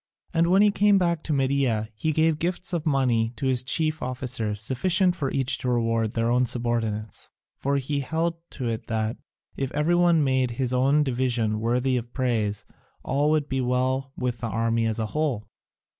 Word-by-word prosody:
And 165 0 +3
when 190 +3 +5
he 210 - +5
came 205 0 +4
back 170 -3 +1
to - - -2
Media 135 -6 +1
he 155 +9 -1
gave 160 0 +2
gifts 180 +2 -2
of 165 -2 -1
money 125 -5 +1
to 140 - -4
his 130 -2 +2
chief 155 +4 0
officers, 125 -5 -3
sufficient 180 - +1
for 140 -6 -2
each 135 0 +1
to 125 - -2
reward 115 -2 0
their 115 0 0
own 125 +1 +2
subordinates, 115 -3 -2 0.3
for 140 +1 -1
he 140 +1 -2
held 165 +4 -1 0.2
to 130 -4 -4
it 115 -1 -4
that, 110 0 -1 0.4
if 135 -2 -3
every 150 +4 +1
one 175 -3 +4
made 130 -2 +1
his 130 -2 0
own 135 +4 +3
division 120 -5 0
worthy 125 +3 +1
of 120 0 -6
praise, 110 -6 -1 0.4
all 145 +3 +1
would 155 -2 +1
be 135 -1 -1
well 130 +2 0
with 125 -2 -2
the 115 0 -3
army 115 +1 0
as 110 - -1
a 110 - -1
whole. 145 -9 -1
130 Hz, 190 wpm, -25 LUFS, 115-150 Hz, 0.4 s, when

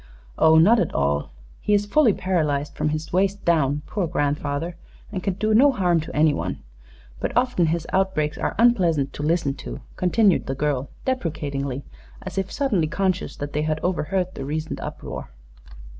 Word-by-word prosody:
"Oh, 160 0 +6
not 210 +9 +6
at - - -1
all. 70 +1 0 0.3
He 210 - +2
is 205 0 +1
fully 245 +3 +4
paralyzed 155 -7 -1
from 155 - -1
his 155 +2 -4
waist 195 +2 +1
down, 150 -3 +2
poor 195 -5 -2
grandfather, 145 +3 -1 0.4
and 190 -3 -3
can 190 -1 -1
do 215 +2 0
no 275 +6 +6
harm 180 -8 +2
to 155 - -7
anyone. 150 -1 +1 0.6
But 245 - -2
often 245 -9 +2
his 165 0 -1
outbreaks 185 -5 +1
are - - -2
unpleasant 180 - +3
to - - -6
listen 155 -2 +1
to," - - -7 0.2
continued 195 +1 +3
the 135 - -2
girl, 140 -1 -1 0.2
deprecatingly, 145 - -2 0.4
as 190 0 -3
if 190 0 -3
suddenly 210 - +1
conscious 185 +3 -1
that 145 0 -6
they 150 - 0
had 155 0 -1
overheard 185 +1 -1
the - - -6
recent 155 +3 -3
uproar. - - -6
170 Hz, 170 wpm, -23 LUFS, 150-195 Hz, 0.6 s, Oh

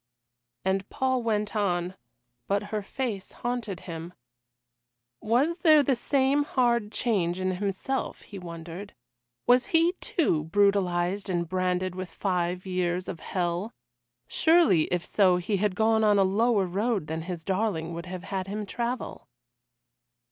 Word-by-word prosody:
And 190 0 0
Paul 260 -1 0
went 210 -2 -1
on 180 -3 0 0.5
but 200 +1 +1
her 210 - 0
face 210 -2 -4
haunted 240 -6 -3
him. 165 +1 -7 1.1
Was 275 +11 +1
there 310 -4 +6
the 270 -1 +2
same 275 +3 +2
hard 235 -6 +1
change 190 -7 0
in 185 -1 -1
himself, 205 +7 -2
he 200 - -9
wondered? 170 +3 -8 0.5
Was 245 +1 +4
he, 330 +2 +3
too, 165 - +1
brutalised 195 0 +1
and 170 -2 0
branded 185 +1 0
with 185 0 -5
the - - -18
five 180 -1 -1
years 180 -1 -1
of 165 - -5
hell? 180 +3 -2 0.5
Surely 320 - +4
if 175 -1 -2
so 185 -3 +4
he 190 +3 -1
had 200 -1 0
gone 220 +1 +3
on 210 -1 +5
a 195 - +5
lower 205 +1 +2
road 200 +1 -1
than 160 +1 -4
his 175 -1 -6
darling 185 -4 -1
would 170 +2 -6
have 180 0 -6
had 190 -2 -3
him 210 +2 -4
travel. 240 +4 -4
195 Hz, 145 wpm, -27 LUFS, 180-230 Hz, 1.1 s, there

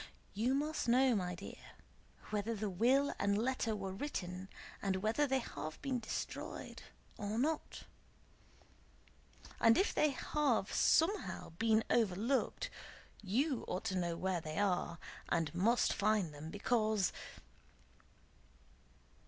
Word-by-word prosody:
You 235 +6 +1
must 300 -1 -1
know, 255 +1 +5
my 180 -3 -1
dear, - - -11 0.6
whether 215 +2 -1
the 210 -1 -2
will 255 +9 +3
and 200 0 +2
letter 230 -1 0
were 195 -2 -4
written, 190 -6 -4 0.3
and 195 -1 0
whether 230 +7 +2
they 265 0 +2
have 155 -10 -5
been 265 -3 0
destroyed 220 - -5 0.4
or 205 +1 -3
not. 300 +5 -1 1.8
And 225 0 +6
if 390 - +2
they 300 - +3
have 275 -6 0
somehow 375 +5 +2
been 220 +5 +2
overlooked, 235 - +1 0.5
you 250 +7 0
ought 180 - -2
to 195 -4 -1
know 170 -2 -1
where 185 -2 -1
they 155 0 -6
are, 180 -4 +1 0.3
and 160 -3 0
must 220 +8 +3
find 205 -6 +1
them, 150 +2 -8
because..." 215 -1 +1
215 Hz, 120 wpm, -36 LUFS, 190-260 Hz, 1.8 s, And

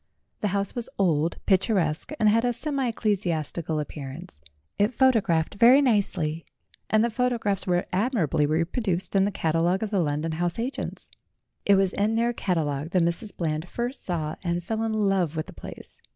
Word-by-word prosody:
The 210 - 0
house 200 0 -1
was 240 -2 -3
old, 165 -4 +1
picturesque, 190 - +1
and 215 - +4
had 225 +2 +4
a 245 0 +1
semi 275 0 -1
ecclesiastical 170 -8 -1
appearance; 150 - -7 0.4
it 210 +4 +2
photo 260 -4 +4
gfaphed 165 -4 0
very 245 +4 +8
nicely, 190 - +1 0.5
and 215 0 +4
the 235 - +1
photographs 230 -5 0
were 175 0 +1
ad 220 +8 +1
mirably 150 - +1
reproduced 175 +4 -1
in 195 0 +4
the 205 - 0
catalogue 170 +2 +1
of 215 - -3
the 200 - +1
London 150 0 -1
house 175 +2 -1
agents. 245 +4 -4 0.6
It 200 - +6
was 195 -1 +2
in 215 +2 +1
their 235 +1 +1
catalogue 160 -8 -1
that 180 -2 +4
Mrs. 170 +5 -2
Bland 160 0 -2
first 245 +3 -4
saw 160 -4 -3
and 175 -1 -1
fell 220 +5 -2
in 225 -1 -1
love 195 -6 +1
with 155 - -2
the - - -12
place. - - -11
190 Hz, 180 wpm, -26 LUFS, 165-225 Hz, 0.6 s, very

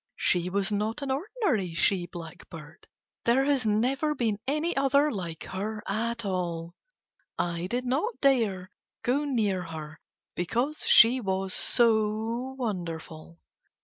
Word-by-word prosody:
She 180 0 +1
was 200 +2 0
not 215 +6 -1
an 270 - -2
ordinary 275 - -1
she 175 0 +2
blackbird, 165 -1 -11 0.4
there 245 +3 +3
has 275 -4 +1
never 265 +8 +1
been 220 -6 0
any 305 +5 0
other 280 +2 +3
like 175 -6 -5
her 210 +3 -4
at 230 +2 -1
all. 170 -3 -3 0.6
I 175 0 -1
did 245 +5 -2
not 310 - -1
dare 215 -10 +2 0.3
go 275 +5 +1
near 215 -9 0
her 155 -2 -8 0.3
because 245 - -1
she 245 +3 +7
was 190 -2 -2
so 225 +2 +2
wonderful. 165 - -5
215 Hz, 125 wpm, -28 LUFS, 180-260 Hz, 0.6 s, she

